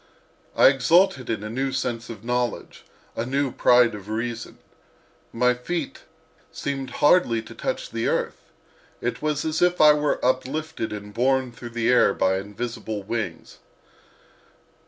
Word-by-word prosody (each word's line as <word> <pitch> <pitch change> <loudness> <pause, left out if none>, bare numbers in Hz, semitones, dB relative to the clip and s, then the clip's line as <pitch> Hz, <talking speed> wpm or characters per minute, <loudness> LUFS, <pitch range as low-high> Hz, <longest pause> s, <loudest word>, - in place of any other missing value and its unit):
I - - +7
exulted 140 +1 +3
in 110 -2 -2
a 105 - -5
new 135 +3 -1
sense 120 -2 -3
of 110 -3 -9
knowledge, 120 -1 -3 0.3
a 115 - -2
new 135 +2 -1
pride 120 -2 +4
of 105 0 -9
reason. 115 +1 -4 0.7
My 125 +2 +2
feet 165 +8 -5 0.5
seemed 135 -2 -4 0.2
hardly 145 -8 +4
to - - -11
touch - - -4
the - - -2
earth; 485 -1 -2 0.5
it - - -3
was 150 0 -1
as 160 0 -1
if 180 0 +3
I 150 -1 +8
were 150 -1 0
uplifted 130 +1 -1
and 105 -1 -7
borne 130 +2 +1
through 120 0 -9
the 120 0 +1
air 125 -5 +4
by 95 0 +2
invisible 105 +1 -5
wings. 110 +2 -5
125 Hz, 145 wpm, -24 LUFS, 115-145 Hz, 0.7 s, I